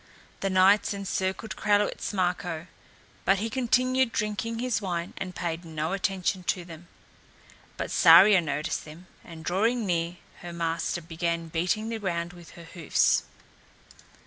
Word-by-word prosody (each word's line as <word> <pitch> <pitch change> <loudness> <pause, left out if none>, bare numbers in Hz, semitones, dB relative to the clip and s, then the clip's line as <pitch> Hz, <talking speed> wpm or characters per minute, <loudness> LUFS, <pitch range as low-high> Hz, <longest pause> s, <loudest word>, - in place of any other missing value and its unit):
The 195 - -1
knights 195 +2 +4
encircled 195 +1 -3
Kralewitz 205 0 +1
Marko, 180 -4 -2 0.6
but 195 +1 +3
he 220 +3 -3
continued 255 0 +2
drinking 210 +1 -2
his 245 -2 -1
wine 175 -3 -3
and 185 -2 -5
paid 170 -1 -3
no 160 +1 -3
attention 190 -1 -1
to 180 0 -1
them. 170 0 -12 0.9
But - - -4
Saria 185 +3 +8
noticed 150 -1 -2
them, 155 +4 -12 0.2
and 160 -2 -11
drawing 225 +7 +1
near 170 -1 -1 0.2
her 175 -1 -8
master 170 0 -2
began 170 0 -3
beating 180 +7 -1
the 225 -1 -3
ground 175 -3 -3
with 175 -2 -14
her 170 - -10
hoofs. 165 -1 +1
180 Hz, 140 wpm, -27 LUFS, 170-205 Hz, 0.9 s, Saria